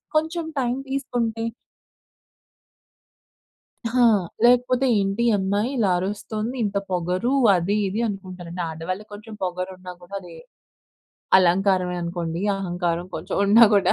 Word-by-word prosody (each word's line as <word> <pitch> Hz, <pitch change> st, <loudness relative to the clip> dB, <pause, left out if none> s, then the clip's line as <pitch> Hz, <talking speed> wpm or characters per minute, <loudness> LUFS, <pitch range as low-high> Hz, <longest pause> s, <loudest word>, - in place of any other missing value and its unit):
కొంచెం 320 Hz, +2 st, 0 dB
టైమ్ 250 Hz, +1 st, 0 dB
తీసుకుంటే 235 Hz, -4 st, -2 dB, 2.5 s
హా! 250 Hz, -1 st, +4 dB, 0.4 s
లేకపోతే 250 Hz, +2 st, +4 dB
ఏంటి 195 Hz, +4 st, 0 dB
ఈ -, -, +4 dB
అమ్మాయి, 200 Hz, +5 st, 0 dB
ఇలా 205 Hz, -5 st, +2 dB
అరుస్తుంది. 215 Hz, +5 st, -3 dB
ఇంత 200 Hz, -1 st, -1 dB
పొగరు 180 Hz, +7 st, 0 dB, 0.2 s
అది 180 Hz, +4 st, 0 dB
ఇది 205 Hz, +4 st, -3 dB
అనుకుంటారండి. 185 Hz, -3 st, -6 dB
ఆడవాళ్ళకి 185 Hz, +6 st, -5 dB
కొంచెం 215 Hz, +1 st, -10 dB
పొగరున్నా 185 Hz, 0 st, -4 dB
కూడా 185 Hz, +3 st, -9 dB
అది -, -, -12 dB, 1.1 s
అలంకారమే 185 Hz, 0 st, +2 dB
అనుకోండి. 170 Hz, 0 st, -3 dB, 0.2 s
అహంకారం 175 Hz, -2 st, -2 dB
కొంచెం -, -, -4 dB
ఉన్నా 225 Hz, +3 st, +7 dB
కూడా 195 Hz, -2 st, +4 dB
195 Hz, 110 wpm, -23 LUFS, 180-230 Hz, 2.5 s, ఉన్నా